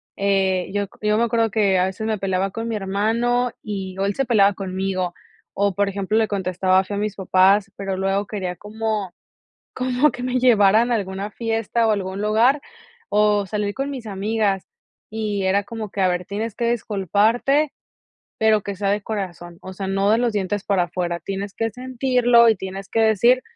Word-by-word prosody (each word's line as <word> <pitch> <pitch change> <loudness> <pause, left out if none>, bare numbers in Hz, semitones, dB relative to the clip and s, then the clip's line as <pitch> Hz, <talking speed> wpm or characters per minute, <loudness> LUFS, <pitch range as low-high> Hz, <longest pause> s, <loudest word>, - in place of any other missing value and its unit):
eh, 195 -2 +1
yo 205 0 0
c 210 +2 -7
yo 210 0 +3
me 235 - +2
acuerdo 230 -1 +1
que 200 -3 +2
a 180 - +3
veces 190 +3 -4
me 220 -2 -1
peleaba 190 0 -1
con 225 +3 -4
mi 230 - -2
hermano 225 +5 0
y 190 -3 -5
o 195 - 0
él 200 - 0
se 270 - 0
peleaba 205 -4 +4
conmigo, 185 -2 -3 0.4
o 200 -1 +1
por 200 +1 +1
ejemplo, 200 +2 -1
le 220 -1 +3
contestaba 185 -1 +1
feo 200 +1 -5
a - - -1
mis 210 -1 -2
papás, 195 +1 +3
pero 195 -1 -3
luego 195 +1 0
quería 185 -4 -4
como 210 -1 -3 0.6
como 255 +3 +2
que 245 - -8
me 255 0 0
llevaran 225 -1 +4
a - - +3
alguna 195 0 -4
fiesta 225 +1 -1
o - - +3
algún 190 -1 -3
lugar, 230 +7 +3 0.5
o 210 -1 +3
salir 205 0 -2
con 275 +1 -3
mis 255 -5 -7
amigas, 200 -1 -1 0.4
y 210 -3 -2
era 195 +2 +2
como 215 0 -6
que: 200 - -4
"A 185 - +4
ver, 180 0 -2
tienes 210 +2 -4
que 235 0 0
disculparte, 230 - +1 0.7
pero 220 -1 +3
que 200 - -5
sea 195 +1 -2
de 205 0 0
corazón, 175 -5 -5
o 190 - -9
sea, 195 0 -5
no 195 +1 +1
de 220 - +5
los 240 -1 +1
dientes 200 -1 -2
para 190 -3 +2
afuera, 175 -1 -3
tienes 195 +3 -5
que 225 0 -1
sentirlo 250 -1 +3
y 220 - +4
tienes 190 +1 -7
que 225 - 0
decir, 225 +4 +4
205 Hz, 195 wpm, -22 LUFS, 195-225 Hz, 0.7 s, de